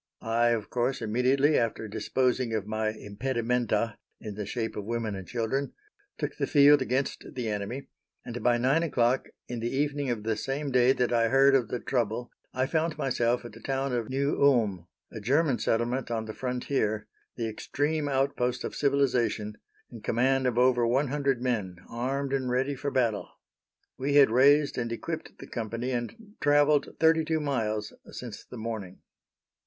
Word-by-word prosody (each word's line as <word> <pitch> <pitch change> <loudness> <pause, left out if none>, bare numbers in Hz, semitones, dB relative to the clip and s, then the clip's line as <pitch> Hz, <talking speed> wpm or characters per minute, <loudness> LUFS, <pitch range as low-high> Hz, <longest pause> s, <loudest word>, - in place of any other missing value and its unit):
I, 115 +1 +2
of 115 -4 0
course, 125 +2 0
immediately, 130 +6 +2
after 115 -1 -2
disposing 125 +2 0
of 105 -2 -2
my 110 0 -1
impedimenta 115 +1 -1 0.2
in 105 -2 -6
the 105 -1 -5
shape 115 0 -3
of 105 - -4
women 115 0 -2
and 95 -2 -7
children, 125 +4 -2 0.4
took - - -4
the - - -1
field 145 -1 +6
against 130 +1 -1
the 125 -3 -3
enemy, 110 +6 -4 0.4
and 120 0 -5
by 120 -1 +3
nine 135 +7 +2
o'clock 130 -5 +1 0.2
in 120 -1 -4
the 115 +1 -2
evening 145 0 -1
of 115 -3 -2
the 110 0 0
same 135 +5 -3
day 125 0 +5
that 125 -2 +1
I 115 -1 +3
heard 135 +3 +5
of 130 -4 +3
the 125 - -3
trouble 120 -1 -2 0.2
I 130 +1 0
found 160 +2 -1
myself 120 -2 0
at 120 - -7
the 110 - -13
town 135 +1 -2
of 115 -2 -2
New 140 +2 0
Ulm, 105 -11 +3 0.2
a 110 - -7
German 135 +4 +2
settlement 120 +3 0
on 115 -2 -2
the 110 - -6
frontier, 125 -4 -1 0.3
the 115 -2 -2
extreme 145 +7 -1
outpost 135 -2 0
of - - -4
civilization, 125 -6 +1 0.4
in 115 -3 -10
command 130 +4 +2
of 120 -2 -1
over 125 -1 +4
one 135 +4 +2
hundred 135 -3 0
men, 105 -8 -1
armed 135 +3 -2
and 130 -2 0
ready 130 +3 +1
for 140 +1 -3
battle. 120 -6 0 0.7
We 140 +2 0
had 140 -5 +7
raised 140 +3 +4
and 120 -1 -2
equipped 160 +7 -5
the - - -10
company 115 +2 -4
and 205 - -5
travelled 145 0 +3
thirty 160 0 +4
two 160 0 0
miles 110 -8 -2 0.2
since 115 -4 -8
the 125 - -11
morning. 110 -5 -6
125 Hz, 175 wpm, -28 LUFS, 115-135 Hz, 0.7 s, had